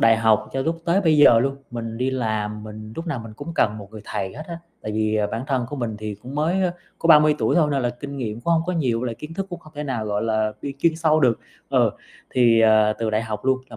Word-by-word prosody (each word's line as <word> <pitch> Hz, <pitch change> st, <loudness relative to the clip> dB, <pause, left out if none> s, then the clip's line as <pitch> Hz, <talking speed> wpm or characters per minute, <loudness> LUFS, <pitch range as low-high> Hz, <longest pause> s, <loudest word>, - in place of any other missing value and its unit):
đại 115 Hz, 0 st, +5 dB
học 110 Hz, -1 st, +2 dB
cho 135 Hz, -, -1 dB
lúc 165 Hz, +2 st, -1 dB
tới 175 Hz, +3 st, +3 dB
bây 160 Hz, -5 st, +3 dB
giờ 130 Hz, -5 st, +8 dB
luôn, 135 Hz, +2 st, 0 dB
mình 115 Hz, -1 st, -5 dB
đi 130 Hz, +1 st, 0 dB
làm 110 Hz, -4 st, -2 dB
mình 110 Hz, 0 st, -9 dB
lúc 165 Hz, -, -5 dB
nào 155 Hz, -6 st, -2 dB
mình 115 Hz, -1 st, -9 dB
cũng 145 Hz, +8 st, -7 dB
cần 105 Hz, -6 st, +1 dB
một 100 Hz, -2 st, -11 dB
người 110 Hz, 0 st, -9 dB
thầy 95 Hz, -1 st, -4 dB
hết 150 Hz, -, -7 dB
á, 170 Hz, -1 st, -5 dB, 0.2 s
tại 110 Hz, -, -4 dB
vì, 110 Hz, 0 st, 0 dB
à, 105 Hz, -1 st, +1 dB
bản 115 Hz, +3 st, -4 dB
thân 130 Hz, -4 st, 0 dB
của 145 Hz, -, -5 dB
mình 115 Hz, -5 st, -3 dB
thì 105 Hz, -1 st, -5 dB
cũng 125 Hz, +7 st, -10 dB
mới, 165 Hz, +6 st, +1 dB
á, 180 Hz, -2 st, +1 dB, 0.3 s
có -, -, -1 dB
30 150 Hz, -2 st, +7 dB
tuổi -, -, +1 dB
thôi 160 Hz, -4 st, +4 dB
nên 140 Hz, -2 st, 0 dB
là 120 Hz, -, +1 dB
kinh 140 Hz, +4 st, -8 dB
nghiệm 115 Hz, -4 st, -4 dB
cũng 170 Hz, +8 st, +1 dB
hông 165 Hz, -1 st, +3 dB
có 180 Hz, -, 0 dB
nhiều, 130 Hz, -9 st, 0 dB
với 125 Hz, -, -2 dB
lại 115 Hz, -, -3 dB
kiến 150 Hz, +7 st, -9 dB
thức 195 Hz, +2 st, -3 dB
cũng 175 Hz, -, -5 dB
không 155 Hz, -, -16 dB
thể 150 Hz, -, -3 dB
nào, 120 Hz, -6 st, -3 dB
gọi 105 Hz, -1 st, -1 dB
là, 110 Hz, -1 st, 0 dB
vi 140 Hz, -, -4 dB
kiên 160 Hz, +4 st, +1 dB
sâu 155 Hz, -1 st, +3 dB
được. 125 Hz, -5 st, +3 dB, 0.3 s
Ờ, -, -, +3 dB, 0.4 s
thì, 120 Hz, -3 st, +4 dB
à, 110 Hz, -1 st, +5 dB
từ 115 Hz, -1 st, -1 dB
đại 110 Hz, +1 st, +1 dB
học 110 Hz, -1 st, -5 dB
luôn 130 Hz, 0 st, +3 dB
là 110 Hz, -, -9 dB
120 Hz, 290 wpm, -23 LUFS, 110-150 Hz, 0.4 s, giờ